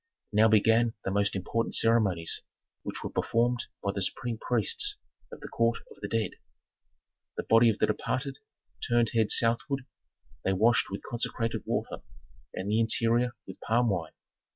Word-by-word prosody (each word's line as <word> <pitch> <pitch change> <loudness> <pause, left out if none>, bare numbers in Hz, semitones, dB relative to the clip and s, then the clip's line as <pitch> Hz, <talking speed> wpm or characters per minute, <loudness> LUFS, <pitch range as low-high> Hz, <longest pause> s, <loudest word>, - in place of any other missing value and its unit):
Now 110 +2 +6
began 110 +2 +3
the 95 - -1
most 100 +1 +1
important 115 +5 -1
ceremonies, 100 -8 +2 0.4
which - - -6
were - - -4
performed 120 +1 0 0.2
by 100 - 0
the 100 - -3
supreme 115 +4 -2
priests 125 - 0 0.3
of - - -10
the - - -7
court 115 0 +1
of - - -14
the 105 - -3
dead: 110 +1 -1 1.1
The - - -2
body 115 +1 +5
of 110 - 0
the - - +3
departed, 130 +6 -2 0.5
turned 120 -1 +3
head 110 -2 +2
southward, 125 +3 +2 0.6
they 95 - +1
washed 115 +4 +3
with 100 - -6
consecrated 115 -1 -3
water - - -2 0.5
and 95 - -5
the 110 - +2
interior 115 +2 +2
with - - -10
palm 120 +1 +2
wine. 85 -5 -2
115 Hz, 155 wpm, -29 LUFS, 105-120 Hz, 1.1 s, Now